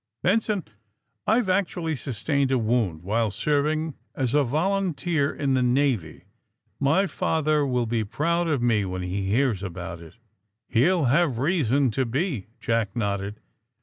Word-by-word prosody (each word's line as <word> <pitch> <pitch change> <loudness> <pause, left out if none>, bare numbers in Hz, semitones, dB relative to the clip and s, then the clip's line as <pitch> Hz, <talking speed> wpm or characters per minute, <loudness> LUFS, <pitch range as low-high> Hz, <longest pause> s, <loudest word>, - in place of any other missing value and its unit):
Ben 205 +5 +4
son, 205 -4 -2 0.6
I've 225 0 +3
actually 180 -4 0
sustained 135 +2 -1
a 130 - +3
wound 110 -8 0
while 110 +3 +1
serv 145 +7 +1
ing 155 0 -1 0.2
as 130 -3 -1
a 145 0 +4
volunteer 165 0 0
in 140 -2 -1
the 130 - +2
Navy, 125 - 0 0.6
My 150 +8 +3
father 155 -5 +1
will 125 -2 0
be 115 -1 0
proud 170 +10 0
of 145 -6 0
me 110 -4 +3
when 90 -1 -4
he 95 +2 -2
hears 115 -2 +1
about 85 -3 -6
it." 80 -1 -13 0.5
He'll 160 +9 +3
have 140 0 +2
reason 140 -3 +2
to 130 +4 0
be," 130 - -2
Jack 115 -4 -1
nodded. 100 -2 -2
135 Hz, 150 wpm, -25 LUFS, 110-160 Hz, 0.6 s, Ben